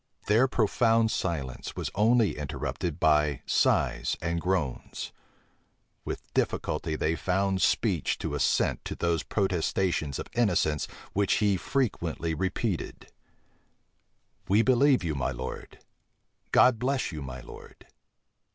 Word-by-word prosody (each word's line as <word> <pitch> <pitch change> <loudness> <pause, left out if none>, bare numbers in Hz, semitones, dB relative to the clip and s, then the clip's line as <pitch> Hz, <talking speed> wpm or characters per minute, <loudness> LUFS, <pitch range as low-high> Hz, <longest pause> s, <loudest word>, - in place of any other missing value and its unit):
Their 115 +6 +4
profound 115 -1 +2
silence 70 -8 -3
was - - -4
only 110 +1 +3
interrupted 75 +2 -4
by 75 -4 +2
sighs - - +1
and 85 0 -2
groans: 90 -8 -2 0.9
with - - -6
difficulty 75 +1 -1
they 80 +1 0
found 95 +2 0
speech - - +1
to - - -4
assent - - +1
to - - -4
those 85 -1 0
protestations 90 - 0
of - - -5
innocence 90 -10 +1 0.3
which 100 -1 +2
he 105 -2 +2
frequently 85 - -1
repeated: 95 +3 -3 1.4
"We 105 +4 +5
believe 130 -1 +4
you, 80 -2 -1
my 70 -3 -1
lord! 65 +2 -6 0.7
God 125 -3 +5
bless 130 -1 0
you, 75 -2 -6
my 65 -2 -7
lord!" - - -13
90 Hz, 115 wpm, -28 LUFS, 75-110 Hz, 1.4 s, We